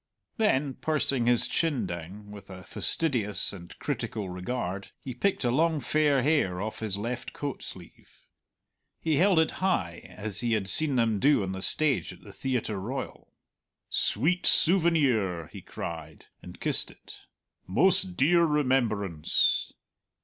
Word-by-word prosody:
Then 150 - +1
pursing 140 -5 0
his 120 -1 +4
chin 160 -6 0
down, 95 +5 -8
with 100 -1 -12
a 95 -1 -10
fastidious 115 - 0
and 85 -3 -11
critical 105 -4 -4
regard, 95 +1 -4
he 130 - -7
picked 190 +9 -1
a 120 - +1
long 160 +3 +2
fair 145 -3 +1
hair 135 - +1
off 110 +2 -5
his 105 -3 -2
left 120 +4 -5
coat 145 -2 -5
sleeve. 90 -3 -12 0.7
He 160 -3 0
held 190 +2 +4
it 160 - +3
high 90 - 0 0.2
as 105 -1 -5
he 120 0 0
had 105 -3 -1
seen 145 +7 +3
them 115 -4 +1
do 140 -2 +3
on 95 - -3
the 95 0 -6
stage 150 +2 +2
of 90 - -17
the 100 - -13
Theatre 120 -6 -2
Royal. 130 +6 -6 0.6
"Sweet 165 - +1
souvenir!" 140 - +2
he - - -8
cried, 80 -2 -8 0.2
and - - -12
kissed - - +3
it, - - -14 0.4
"most 185 - +3
dear 170 +5 +4
remembrance!" 120 - +1
120 Hz, 145 wpm, -27 LUFS, 100-150 Hz, 0.7 s, his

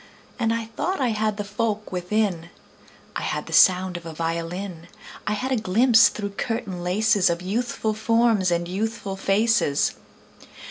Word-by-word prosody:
And 225 -2 +1
I 230 0 -1
thought 260 - -3
I 255 -3 +1
had 215 -1 -1
the 205 - -2
folk 210 +1 -3
within: 180 -2 -1 0.7
I - - -2
had - - -3
the - - -9
sound 185 -1 +5
of 170 - -11
a 165 - -7
violin; 170 +2 -4 0.4
I 210 - +1
had 255 +6 -3
a - - +3
glimpse 225 +2 +5
through 205 -1 -5
curtain 205 -4 -4
laces 200 +1 +2
Of 170 +1 -2
youthful 220 +2 -2
forms 225 -3 +2
and 170 0 0
youthful 200 +1 -3
faces. 195 -5 +2
205 Hz, 155 wpm, -24 LUFS, 180-225 Hz, 0.7 s, sound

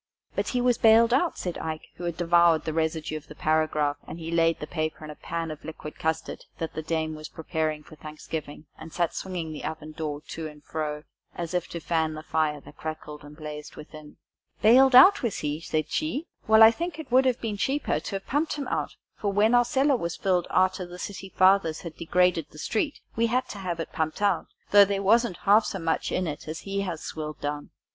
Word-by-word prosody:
"But - - -1
he 250 - 0
was 245 -1 +2
bailed 230 +1 +6
out," 330 +6 +2
said 180 -2 -4
Ike, 160 -1 -5
who 175 - -6
had 170 -2 -3
devoured 170 -1 +4
the 160 - -2
residue 160 -1 -1
of 155 - -12
the 150 - -11
paragraph, 155 -2 +1
and 170 - -7
laid 165 0 +1
the - - -4
paper 155 -1 -3
in 150 - -7
a - - -10
pan 165 0 -4
of 155 - -9
liquid 155 -1 -8
custard 160 0 -2
that 165 - -4
the 155 - -4
dame 160 0 -2
was 155 0 -8
preparing 155 -1 -3
for 155 - -14
Thanksgiving, 155 0 -7
and 160 +1 -9
sat 170 0 0
swinging 175 -4 -4
the 150 - -7
oven 155 -1 -5
door 155 -2 -4
to 160 -1 -5
and 150 -1 -13
fro 150 -1 -4 0.3
as 170 0 -4
if 180 -1 -1
to 170 - -6
fan 160 -1 0
the 155 - -7
fire 155 -2 0
that 145 - -15
crackled 150 -2 -7
and 145 +1 -12
blazed 150 -1 -8
within. 150 0 -12 0.5
"Bailed 255 +4 +7
out, 375 +11 +9
was 235 -5 -1
he?" 150 +1 -2
said 155 -2 -2
she; 310 0 -1 0.2
"well, 220 0 +8
I 220 - +10
should - - -13
think 340 -2 -3
it 315 -6 -9
would 260 +1 +5
have 255 -1 +2
been 215 -3 -3
cheaper 275 +8 0
to 200 - -5
have 195 - -5
pumped 295 +4 0
him 290 -2 -4
out, - - -2 0.2
for, 205 - 0
when 210 +4 +3
our 245 0 +6
cellar 270 +2 +2
was 170 -6 -3
filled, 180 -3 +1
arter 185 -1 +1
the 175 0 -10
city 195 +1 -6
fathers 185 -4 +3
had 170 -2 -8
degraded 175 -2 +2
the - - -15
street, 230 - -1 0.2
we 230 +1 +2
had 255 +3 0
to 205 - -7
have 175 -3 -3
it 165 - -5
pumped 160 +5 -2
out, 195 -5 +2 0.2
though 205 0 +9
there 200 0 -1
wasn't 225 -2 +3
half 210 +3 +6
so 195 - -3
much 165 -2 -1
in 185 - 0
it 150 -2 -5
as 160 +1 -5
he 200 0 -2
has 175 -5 -4
swilled 155 -1 -6
down." 145 0 -4
165 Hz, 230 wpm, -26 LUFS, 155-205 Hz, 0.5 s, I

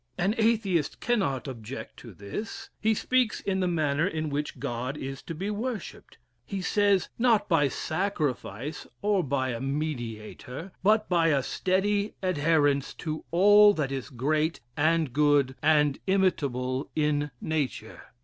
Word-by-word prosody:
An 190 +4 +1
Atheist 210 -8 +1
cannot 170 - 0
object 125 0 -7
to 115 - -11
this. 100 - -7
He 220 0 +2
speaks 250 0 +1
in 190 -1 -1
the 185 - +1
manner 155 -1 +1
in 155 -5 -3
which 145 0 -3
God 125 +1 -3
is 135 -1 -6
to 165 - -7
be 195 +6 -3
worshipped. 225 +1 -5 0.3
He 195 +9 -5
says, 200 0 +2
not 230 -3 +3
by 165 -6 +3
sacrifice, 150 - -3 0.2
or 205 -3 +2
by 130 -2 -1
a 120 -2 -3
Mediator, 135 - -4
but 215 +2 +3
by 170 -2 +3
a 140 -4 +2
steady 200 +5 0
adherence 145 -5 +2
to 155 -1 -5
all 205 +4 +6
that 140 -4 -1
is 135 -2 -4
great 150 +5 0 0.2
and 155 -3 +2
good 145 -2 +3
and 150 -2 +3
imitable 140 -9 0
in 150 -1 +1
nature. 145 -8 -3
155 Hz, 140 wpm, -27 LUFS, 135-195 Hz, 0.3 s, all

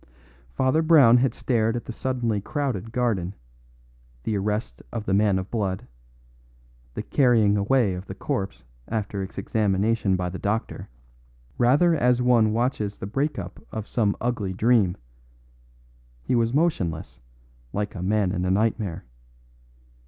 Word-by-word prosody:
Father 130 +5 +2
Brown 145 -8 +6
had 125 -1 +1
stared 115 -2 0
at 120 - -4
the - - -6
suddenly 120 -4 -1
crowded 120 -5 -3
garden, 105 -7 -1 0.9
the 110 - -1
arrest 105 - -2
of 110 - -4
the 95 - 0
man 100 -1 +3
of 95 +1 -5
blood, 100 -5 -2 1.1
the - - -3
carrying 115 -6 +3
away 105 0 +2
of 90 +2 -7
the 95 - -7
corpse 95 -4 -3 0.2
after 105 -3 -3
its 95 - -7
examination 100 0 +1
by 90 -1 -2
the 90 +1 -6
doctor, 110 +3 -3 0.7
rather 145 +8 +4
as 125 -5 +2
one 120 -3 +4
watches 110 -3 -1
the - - -6
break 135 +9 -1
up 95 -1 -7
of 110 -1 -5
some 105 -4 0
ugly 110 -6 -2
dream; 105 -3 +2 1.3
he - - -1
was 115 -1 +2
motionless, 90 - -1 0.5
like 105 0 -3
a 90 - -6
man 100 0 +1
in 90 -2 -2
a 90 - 0
nightmare. 105 - 0
110 Hz, 145 wpm, -25 LUFS, 95-120 Hz, 1.3 s, Brown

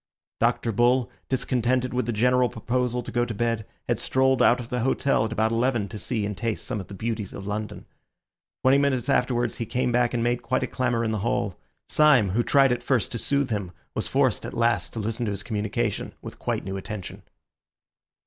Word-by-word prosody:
Dr. 115 - +1
Bull, 120 +3 +2 0.2
discontented 125 0 0
with 125 -2 -1
the - - +1
general 125 +3 +3
proposal 125 +1 -1
to - - -7
go 120 - +1
to 120 -2 -4
bed, 115 -1 -1 0.2
had - - 0
strolled 130 -1 +2
out 125 0 +5
of 120 -1 -7
the 125 - -1
hotel 130 -1 +2
at 110 - -4
about 110 0 +1
eleven 115 -2 +1
to 105 - -7
see 110 -2 -2
and 105 0 -3
taste 115 +1 -3
some 105 - -3
of 95 - -7
the 100 - -9
beauties 110 -1 -3
of 100 - -7
London. 105 +1 -4 0.8
Twenty 135 +2 +5
minutes 135 -4 +1
afterwards, 120 -2 +1
however, 115 - -4
he - - -4
came 125 -1 +2
back 120 0 +2
and 115 - 0
made 120 0 +1
quite 130 +2 0
a - - +2
clamour 120 -2 0
in 110 - 0
the 110 - -1
hall. 100 -3 -1 0.3
Syme, 140 -10 +5
who 115 +5 +2
tried 135 +1 +4
at 125 - 0
first 130 -5 0
to 115 - -3
soothe 140 0 0
him, 100 -4 -2 0.2
was - - -1
forced - - +1
at - - -6
last 115 -6 +1
to 115 - -4
listen 115 +3 -2
to - - 0
his 100 - -4
communication 110 0 -2
with - - -9
quite - - -2
new 95 0 -3
attention. 100 -1 -7
120 Hz, 215 wpm, -25 LUFS, 110-125 Hz, 0.8 s, out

